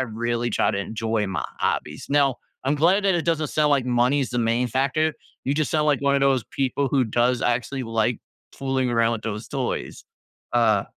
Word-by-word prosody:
really 120 Hz, 0 st, -2 dB
try -, -, +2 dB
to 100 Hz, -, -1 dB
enjoy 110 Hz, +1 st, -2 dB
my 90 Hz, -6 st, -3 dB
hobbies. -, -, -2 dB
Now, 140 Hz, -3 st, +2 dB, 0.3 s
I'm 145 Hz, -, +2 dB
glad 185 Hz, +7 st, +3 dB
that 195 Hz, -, +3 dB
it 170 Hz, -, 0 dB
doesn't 155 Hz, -3 st, +1 dB
sound 150 Hz, -1 st, +2 dB
like 140 Hz, -3 st, +3 dB
money 125 Hz, +3 st, +2 dB
is 130 Hz, -, -2 dB
the 120 Hz, -, -1 dB
main 120 Hz, +2 st, +1 dB
factor. 140 Hz, +6 st, +1 dB, 0.3 s
You 135 Hz, -, 0 dB
just 155 Hz, 0 st, 0 dB
sound 155 Hz, -1 st, +1 dB
like 145 Hz, -3 st, +2 dB
one 140 Hz, 0 st, +3 dB
of 140 Hz, -, +2 dB
those 135 Hz, -4 st, +3 dB
people 135 Hz, +1 st, -1 dB
who 130 Hz, -1 st, +2 dB
does 120 Hz, +2 st, +1 dB
actually 125 Hz, +3 st, -1 dB
like 115 Hz, +1 st, 0 dB, 0.3 s
fooling 135 Hz, -1 st, -1 dB
around 115 Hz, -1 st, +2 dB
with 110 Hz, -, -4 dB
those 110 Hz, 0 st, -5 dB
toys, 135 Hz, -3 st, -3 dB, 0.5 s
uh 110 Hz, -4 st, +3 dB
125 Hz, 200 wpm, -24 LUFS, 115-140 Hz, 0.5 s, glad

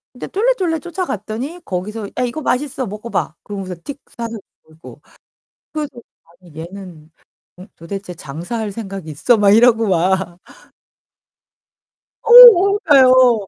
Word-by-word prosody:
이제 -, -, -8 dB
쫄래쫄래 390 Hz, -7 st, -1 dB
쫓아갔더니 290 Hz, -, -6 dB
거기서 205 Hz, +3 st, -5 dB
"야, 250 Hz, -, 0 dB
이거 250 Hz, +6 st, -4 dB
맛있어, 265 Hz, -1 st, -2 dB
먹어 210 Hz, +4 st, -8 dB
봐." 160 Hz, -, -3 dB
그러면서 195 Hz, -3 st, -7 dB
틱 285 Hz, 0 st, -8 dB, 0.2 s
사서 230 Hz, -1 st, -5 dB, 0.3 s
주고. 160 Hz, +1 st, -15 dB, 0.7 s
그래서 305 Hz, -2 st, -4 dB, 0.5 s
'아니, 175 Hz, -4 st, -19 dB
얘는 170 Hz, -3 st, -11 dB, 0.7 s
도대체 180 Hz, +2 st, -8 dB
장사할 175 Hz, -, -6 dB
생각이 195 Hz, -6 st, -8 dB
있어?' 225 Hz, -, +1 dB
막 200 Hz, -1 st, +3 dB
이러고 225 Hz, 0 st, +4 dB
막. 180 Hz, 0 st, -1 dB, 1.9 s
어우, 415 Hz, -5 st, +8 dB
그러니까요. 255 Hz, -6 st, +5 dB
220 Hz, 275 characters per minute, -17 LUFS, 185-275 Hz, 1.9 s, 어우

